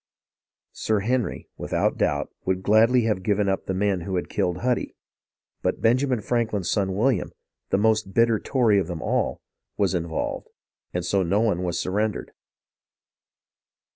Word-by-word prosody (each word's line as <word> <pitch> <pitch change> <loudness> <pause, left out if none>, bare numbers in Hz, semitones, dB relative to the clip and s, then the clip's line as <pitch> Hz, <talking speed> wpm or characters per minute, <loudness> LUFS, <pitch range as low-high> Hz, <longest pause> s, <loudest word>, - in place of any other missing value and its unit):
Sir 110 -2 0
Henry, 120 +2 -1
without - - 0
doubt, - - 0
would 95 0 -1
gladly 115 +5 +4
have 105 -4 0
given 100 +1 +1
up 95 0 -1
the 95 - -1
men 100 -1 +1
who 95 +2 -3
had 90 - -2
killed 90 0 -1
Huddy; 125 -1 0 0.7
but - - -1
Benjamin 125 +1 +2
Franklin's 110 -5 -1
son 95 -3 0
William, 115 -2 +1 0.4
the - - +2
most 110 -1 +2
bitter 115 +1 +3
Tory 115 -7 +2
of 95 - -2
them 85 -3 -5
all, - - -1 0.4
was 100 -2 +1
in 85 -2 -1
volved, 80 - -3 0.4
and 90 -1 -3
so 95 +2 +2
no 95 +3 +1
one 105 -6 +1
was 90 -2 -1
surrendered. 105 +3 -1
100 Hz, 155 wpm, -24 LUFS, 95-115 Hz, 0.7 s, gladly